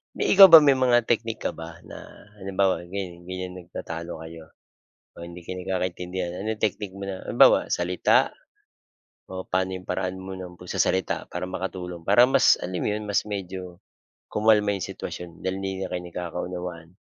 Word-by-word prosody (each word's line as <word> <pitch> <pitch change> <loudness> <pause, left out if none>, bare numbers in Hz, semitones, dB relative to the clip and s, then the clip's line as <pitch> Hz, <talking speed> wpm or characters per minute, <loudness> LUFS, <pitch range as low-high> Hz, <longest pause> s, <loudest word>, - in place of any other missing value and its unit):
May - - -1
ikaw 195 0 +11
ba 165 - +14
may 140 -2 +6
mga 120 -1 +5
technique 115 -1 -1
ka - - +1
ba 80 0 -7 0.2
na, - - -9 0.4
halimbawa, 95 0 0
ganiyan 90 -2 -6
ganiyan 90 0 -5
nagtatalo 85 -1 -7
kayo 80 0 -10 0.7
o 85 - -9
hindi 85 +1 -10
kayo 90 - -6
nagkakaintindihan. 90 -1 -3
Ano 110 +3 -3 0.2
technique 100 -2 -4
mo 100 - -7
na 95 -1 -6
halimbawa, - - +6 0.2
salita 90 +1 +3 1.1
o 95 0 -5
pa'no 95 0 +1
'yong 90 0 -9
paraan 90 0 -2
mo 95 - -6
ng 90 -1 -9
pagsasalita 95 +1 -1
para 90 +1 -3
makatulong, 90 -2 -5
para 105 +5 +7
mas - - +6
alam 90 0 -4
mo - - 0
'yon, 105 +1 -3
mas 100 - +2
medyo 95 -3 -6 0.5
kumalma 105 -1 +3
'yong 95 - -4
sitwasyon, 90 -1 -7
dahil 95 0 -1
hindi 95 0 -3
na - - -7
kayo 90 - -2
nagkakaunawaan? 90 -1 -6
95 Hz, 170 wpm, -25 LUFS, 90-95 Hz, 1.1 s, ba